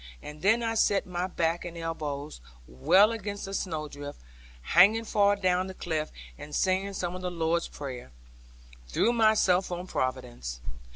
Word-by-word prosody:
And 150 0 -9
then 225 +6 +3
I 225 -1 0
set 205 -2 +2
my 180 0 -2
back 170 -2 -1
and 170 -1 -7
elbows 150 - -5 0.2
well 185 - +4
against 205 -3 -5
a 195 - -6
snowdrift, 150 -6 -4 0.4
hanging 205 - +5
far 205 -2 +3
adown 185 -1 +1
the 190 - -8
cliff, 155 -4 -3 0.3
and 145 0 -7
saying 190 +1 +1
some 180 -2 -3
of 185 - -6
the 180 - -2
Lord's 170 0 0
Prayer, 130 - -8 0.8
threw 220 - +2
myself 215 -5 +3
on 175 +1 -4
Providence. 65 - -3
175 Hz, 155 wpm, -28 LUFS, 150-195 Hz, 0.8 s, hanging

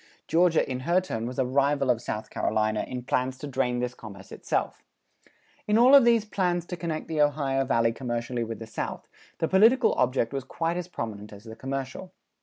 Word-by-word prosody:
Georgia 170 -1 +3
in 130 -1 -3
her 170 +8 +2
turn 115 -11 -4
was 125 - -7
a 130 - +2
rival 140 +1 +2
of 115 -2 -1
South 110 -2 -5
Carolina 110 0 0
in 125 -1 -5
plans 130 +1 -1
to 140 - -7
drain 130 -3 -1
this 125 0 -2
commerce 100 -5 -12
itself. - - -2 0.9
In 210 +1 +3
all 250 +4 +6
of 275 -3 +9
these 230 -2 +4
plans 180 -4 -1
to 180 - -5
connect 165 -2 -4
the 155 -2 0
Ohio 140 -2 +1
Valley 115 -3 +2
commercially 120 -1 -3
with 115 0 -5
the 115 - -8
South, 110 - -5 0.3
the 160 - 0
political 225 +7 +5
object 125 -1 0
was 135 -1 -3
quite 165 +6 -2
as 180 -1 -4
prominent 105 - -6
as 100 0 -12
the 110 -1 -10
commercial. 135 +8 -5
135 Hz, 200 wpm, -27 LUFS, 120-170 Hz, 0.9 s, of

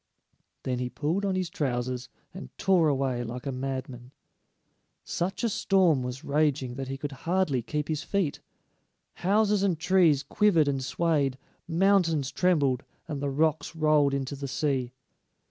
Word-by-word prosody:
Then 125 -1 -2
he 125 0 -2
pulled 165 +10 -1
on 195 -1 0
his 185 -2 -2
trousers 125 -2 -2 0.2
and 65 - -8
tore 180 -4 +3
away 135 -4 0
like 120 +3 -6
a 135 - -2
madman. 130 -2 -5 0.9
Such 185 +7 -3
a - - +3
storm 185 -8 +3
was 125 +3 -5
raging 145 -4 +1
that 135 +1 -5
he 135 +1 -4
could 145 +1 -5
hardly 160 -2 0
keep 150 +5 -3
his 155 -1 -2
feet; 190 -8 -1 0.8
houses 205 +2 +3
and 190 -4 +1
trees 170 -4 +3
quivered 185 -8 +3
and 135 -2 -1
swayed, 145 -3 0 0.3
mountains 165 -5 +2
trembled, 145 -7 +2 0.2
and 145 -4 -4
the 145 - -1
rocks 155 +2 0
rolled 150 -3 +3
into 140 +1 -3
the 140 0 -5
sea. 130 -3 -1
145 Hz, 150 wpm, -27 LUFS, 130-170 Hz, 0.9 s, tore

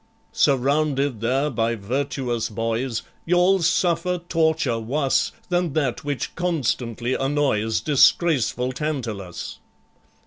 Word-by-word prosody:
"Surrounded 140 -2 +1
there 135 +5 +1
by 115 -1 0
virtuous 120 +1 -2
boys, 115 +2 -2 0.2
You'll 180 +2 +3
suffer 175 +1 +1
torture 160 -8 +1
wus 135 +5 0 0.2
Than 175 -4 0
that 140 -6 -1
which 145 -2 -3
constantly 130 -8 -1
annoys 135 -6 0
Disgraceful 140 -4 +3
TANTALUS. 120 - -4
135 Hz, 95 wpm, -23 LUFS, 115-155 Hz, 0.2 s, You'll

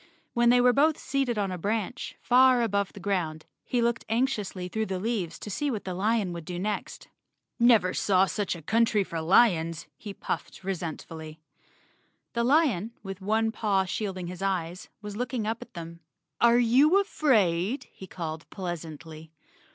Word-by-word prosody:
When 240 -1 +4
they 245 +1 +6
were 250 0 +5
both 300 +3 +3
seated 265 -3 -1
on 200 -2 0
a 180 - -4
branch, 215 +5 -3
far 255 0 +5
above 200 -3 0
the - - -10
ground, 170 -5 -2 0.2
he 245 -2 0
looked 235 0 0
anxiously 215 -6 -1
through 220 +4 -2
the 190 - -2
leaves 195 -6 -2
to 210 - -7
see 290 +9 -1
what 220 -6 -3
the 185 - -3
lion 205 0 0
would 170 -1 -6
do 175 +1 -5
next. 205 +3 -4 0.5
"Never 225 -6 +5
saw 190 -1 +3
such 200 -2 -2
a 165 - -11
country 225 +2 +2
for 165 -3 -5
lions!" 165 -3 +3
he 205 -2 -8
puffed - - -5
re¬ 195 +1 -1
sentfully. 160 -2 -7 1.0
The 235 - 0
lion, 240 - +2
with 195 -1 -7
one 220 +3 +1
paw 200 -4 +1
shading 190 -1 -3
his 180 +2 -7
eyes, 185 -2 -2
was 210 -1 -6
looking 245 -1 -2
up 225 +1 -2
at - - -12
them. 170 0 -8 0.4
"Are 235 0 +5
you 265 +10 +5
afraid?" 225 - +1
he 190 - -11
called 160 -3 -6
pleasantly. 160 -3 -7
200 Hz, 170 wpm, -27 LUFS, 180-235 Hz, 1.0 s, they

